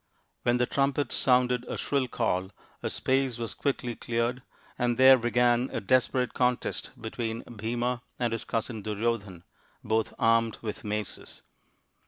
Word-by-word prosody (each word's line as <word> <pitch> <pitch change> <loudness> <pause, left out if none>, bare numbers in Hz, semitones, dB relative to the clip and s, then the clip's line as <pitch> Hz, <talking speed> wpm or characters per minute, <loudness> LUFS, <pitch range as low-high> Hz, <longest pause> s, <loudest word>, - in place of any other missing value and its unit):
Then 120 0 +3
the 125 - +2
trumpets 140 0 0
sounded 125 -1 +3
a - - -4
shrill 140 -3 0
call, 95 -6 -1 0.3
a - - -2
space 130 -2 0
was 115 -2 -3
quickly 125 -4 -2
cleared, 120 +3 -1 0.4
and 120 -1 +1
there 130 +1 +9
began 120 +1 +2
a - - -2
desperate 130 +2 +1
contest 125 -1 0
between 115 +1 -4
Bhima 120 +2 -2 0.2
and 120 -2 0
his 115 - -2
cousin 115 -1 -2
Duryodhan, 105 -4 -2 0.4
both 110 0 0
armed 115 0 +3
with 110 +1 -5
maces. 105 -1 -5
120 Hz, 140 wpm, -28 LUFS, 110-125 Hz, 0.4 s, there